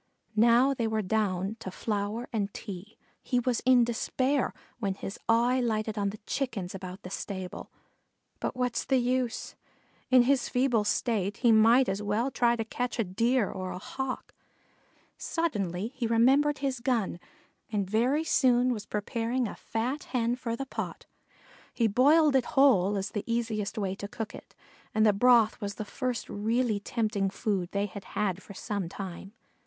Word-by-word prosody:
Now 235 +5 +5
they 235 -4 -1
were 220 -1 0
down 195 0 0
to 190 - -6
flour 210 +4 -3
and 205 -3 -1
tea. 200 0 -8 0.2
He 250 - 0
was 245 -1 0
in 250 -2 +7
despair, 255 +3 0 0.3
when 200 -4 -1
his 195 0 -7
eye 240 +3 +4
lighted 220 -2 -1
on 200 -2 0
the 210 - -7
Chickens 225 -10 -3
about 185 0 -8
the 180 - -8
stable; 190 -2 -5 0.7
but - - -3
what's 250 -2 -1
the 265 - +2
use? 250 -1 -1 0.5
In 255 -1 +7
his 265 0 +2
feeble 245 -4 +2
state 205 -3 0
he 235 - +7
might 230 +4 +6
as 195 +2 -1
well 210 +6 0
try 240 -1 +3
to 225 -1 -3
catch 245 +2 -3
a 230 - +2
Deer 230 +4 +1
or 185 -1 -5
a - - -5
Hawk. 265 +7 -5 0.9
Suddenly 205 - -2
he 255 -2 -3
remembered 270 +6 +4
his 270 -2 -2
gun 235 -8 0 0.5
and 200 -3 0
very 245 +9 +2
soon 250 -4 +3
was 210 -3 -6
preparing 230 +4 -1
a - - -6
fat 250 +6 -3
Hen 240 -1 0
for 235 -2 -3
the 270 - -4
pot. - - -5 0.7
He 235 - +2
boiled 285 +7 +5
it 260 - +3
whole 205 -8 +5
as 195 - -3
the 205 - -3
easiest 225 -2 -2
way 195 -3 -1
to 200 - -5
cook 225 +1 -6
it, - - -12 0.4
and 215 0 +4
the 210 - +5
broth 230 +1 +4
was 200 -1 -4
the 215 - -5
first 250 +2 -3
really 220 +1 0
tempting 205 -2 -1
food 195 -3 -2
they 200 0 0
had 200 0 -8
had 195 -3 0
for 200 - -12
some 200 -3 -3
time. 190 +1 -7
225 Hz, 170 wpm, -29 LUFS, 200-250 Hz, 0.9 s, in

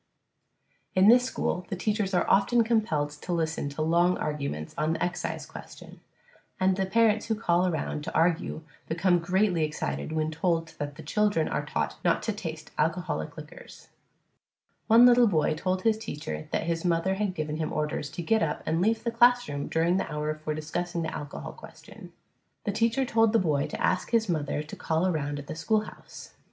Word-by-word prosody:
In 190 +3 +6
this 245 +1 +6
school 180 -7 -2
the - - -2
teachers 205 0 -1
are - - +2
often 230 +5 +4
compelled 210 -11 0
to 150 +4 -8
listen 160 -3 -1
to 150 +2 -3
long 170 +3 +3
arguments 140 - -4
on 155 +1 0
the - - -2
excise 175 0 -3
question, - - -12 0.6
and 185 0 +3
the 190 0 -1
parents 220 +1 +2
who 225 - +1
call 185 -4 +2
around 160 -3 -2
to - - -6
argue 165 -1 +1 0.2
become 175 +2 +2
greatly 180 0 +1
excited 70 - -3
when 155 0 -1
told 165 0 0
that 145 -1 -4
the 160 - -10
children 205 0 +1
are 150 - -2
taught 150 - -2
not 175 -2 +2
to 225 - 0
taste 160 -6 -7
alcoholic 165 +3 -1
liquors. - - -12 1.0
One 230 +2 +8
little 245 -1 +6
boy 155 -7 +2
told 185 +4 -2
his 220 -1 +2
teacher 155 -7 -6
that - - -1
his 165 0 -2
mother 175 +1 +1
had 195 -1 -2
given 155 -1 -3
him 155 -1 -2
orders 150 -1 -2
to 175 - -5
get 220 +6 +2
up 150 -2 -1
and 165 +2 0
leave 220 +3 +1
the 235 - -1
classroom 240 -11 +3
during 170 +3 +1
the - - -3
hour 150 0 -2
for 155 0 -4
discussing 170 +2 -3
the 160 - -4
alcohol 145 -1 -7
question. - - -13 0.5
The 205 - -1
teacher 230 +5 +1
told 225 -2 +3
the - - +5
boy 150 -8 +1
to - - -6
ask 185 - 0
his 230 -2 +2
mother 150 -3 -1
to 155 - -9
call 160 +2 0
around 145 -5 -1
at 145 - -7
the - - -6
schoolhouse. 215 +6 -3
175 Hz, 190 wpm, -27 LUFS, 155-210 Hz, 1.0 s, One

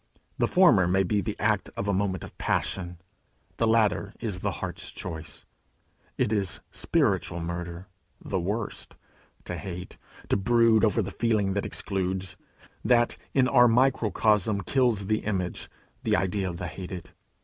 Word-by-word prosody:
The - - +3
former 170 - +5
may 95 +2 +3
be 100 +3 +1
the 105 0 -4
act 105 -2 +1
of 100 - -2
a 100 - +2
moment 95 -2 0
of - - -10
passion: 90 -2 -1 0.6
the 115 - +2
latter 110 -3 +2
is 105 -6 -3
the - - -1
heart's - - -5
choice. 80 -3 -7 0.7
It - - +1
is 100 -6 0
spiritual 100 - 0
murder, 85 +1 -5 0.3
the 95 - -2
worst, 105 +5 -3 0.5
to 90 - -4
hate, 90 -2 -7 0.3
to - - +3
brood 115 +1 +4
over 110 0 +3
the 100 - -5
feeling 105 -4 +1
that 100 - -1
excludes, 95 -1 -2 0.5
that, 120 -1 +3 0.2
in 130 -2 +5
our 120 -1 +6
microcosm, 110 -4 +2
kills 115 -1 +1
the 110 +2 +1
image, 95 -4 -2 0.3
the 110 -5 +2
idea 95 0 0
of 85 - -6
the 85 - -5
hated. 90 +1 -7
100 Hz, 150 wpm, -27 LUFS, 90-110 Hz, 0.7 s, our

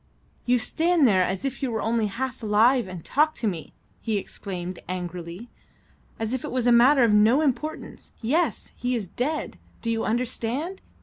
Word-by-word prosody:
"You 250 +1 +4
stand 320 +5 +2
there 190 -4 +4
as 190 +5 -1
if 270 +1 -3
you 265 - 0
were 225 -2 -2
only 225 -1 +1
half 255 +5 -4
alive, 225 +3 +3
and 180 -3 -8
talk 310 +2 +2
to 225 - -1
me," 170 -6 -4 0.3
he 220 -3 -1
exclaimed 185 -2 -6
angrily, 180 +3 -6 0.7
"as 225 +2 -2
if 260 - -2
it - - -4
was 255 -2 -1
a 245 - +5
matter 250 +3 +6
of 225 -3 +4
no 220 +7 +5
importance. 305 +2 -3
Yes, 300 +10 0
he 245 0 -1
is 220 -4 -2
dead! 270 - -3 0.2
Do 230 - 0
you 225 -1 -1
understand? 250 - -2
235 Hz, 180 wpm, -25 LUFS, 205-265 Hz, 0.7 s, matter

